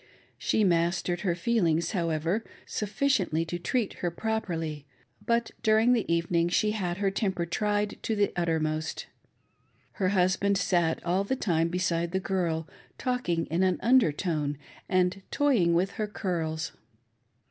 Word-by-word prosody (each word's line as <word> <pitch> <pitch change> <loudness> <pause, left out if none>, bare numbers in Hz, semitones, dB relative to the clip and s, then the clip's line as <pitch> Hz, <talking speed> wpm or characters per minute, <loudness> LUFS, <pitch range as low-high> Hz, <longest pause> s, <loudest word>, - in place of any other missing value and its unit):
She 215 - +1
mastered 175 0 +1
her 180 -4 0
feelings, 170 -5 +1
however, 170 +2 0 0.2
sufficiently 205 - 0
to 175 +1 -4
treat 225 +4 -1
her 175 - +1
properly; 165 -7 -3 0.4
but 235 +1 +1
during 220 +3 +4
the 225 -8 0
evening 170 0 +1
she 210 +4 +2
had 180 -5 -2
her 200 -1 +1
temper 190 -3 -1
tried 205 +4 -1
to 225 - -1
the 205 -1 +1
uttermost. 160 -2 -1 0.9
Her 185 -3 0
husband 195 +1 +2
sat 175 -4 +1
all 180 +3 +1
the 230 +6 -1
time 165 -9 +1
beside 170 -1 -1
the 190 - +2
girl, 170 -4 -1 0.3
talking 250 -11 -1
in 170 +3 +1
an 185 -1 +2
under 245 -8 +5
tone, 150 -3 -2 0.3
and 185 +1 +2
toying 235 - +3
with 185 +3 +1
her 215 - -3
curls. 165 -5 -3
180 Hz, 140 wpm, -28 LUFS, 165-210 Hz, 0.9 s, under